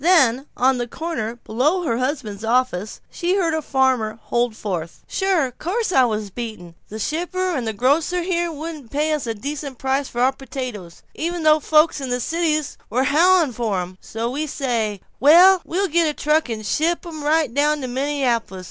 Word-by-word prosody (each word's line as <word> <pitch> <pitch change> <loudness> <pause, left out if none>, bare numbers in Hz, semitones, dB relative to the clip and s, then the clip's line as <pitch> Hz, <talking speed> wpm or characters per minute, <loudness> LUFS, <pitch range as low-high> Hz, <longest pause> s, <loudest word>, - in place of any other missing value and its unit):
Then, 280 -7 +4
on 260 0 +3
the 240 - -2
corner 240 -6 -4
below 270 +11 0
her 235 -7 0
husband's 255 -6 -3
office, 225 -4 0
she 355 +2 0
heard 345 -5 +1
a 315 - 0
farmer 260 -6 +1
holding 240 -1 -1
forth: 175 -7 -5
"Sure. 370 -9 +1
Course 385 - -2
I 260 -7 +5
was 215 -3 -2
beaten. 215 -7 -7 0.2
The 215 - -6
shipper 355 - -2
and 245 -5 -2
the 220 - -1
grocers 300 - +1
here 345 -2 0
wouldn't 305 -4 -7
pay 300 +4 0
us 295 -5 -2
a 225 - -2
decent 280 +3 -5
price 265 +2 0
for 240 - -3
our 260 +2 +4
potatoes, 250 -9 -7
even 340 +1 -3
though 310 0 +5
folks 305 0 +3
in 265 - -4
the 245 0 0
cities 310 +1 -1
were 255 +3 +1
howling 340 -3 +4
for 220 -5 -1
'em. 180 +1 -7
So 230 +2 -4
we 300 +4 -2
says, 235 -7 -1 0.2
well, 355 +6 +7
we'll 390 +4 -1
get 335 0 +2
a 300 - -4
truck 300 -2 +1
and 215 -2 -4
ship 330 +12 0
'em 315 -3 -7
right 305 -4 +2
down 295 +2 +2
to 260 - -3
Minneapolis. 255 -6 -1
275 Hz, 190 wpm, -21 LUFS, 235-320 Hz, 0.2 s, well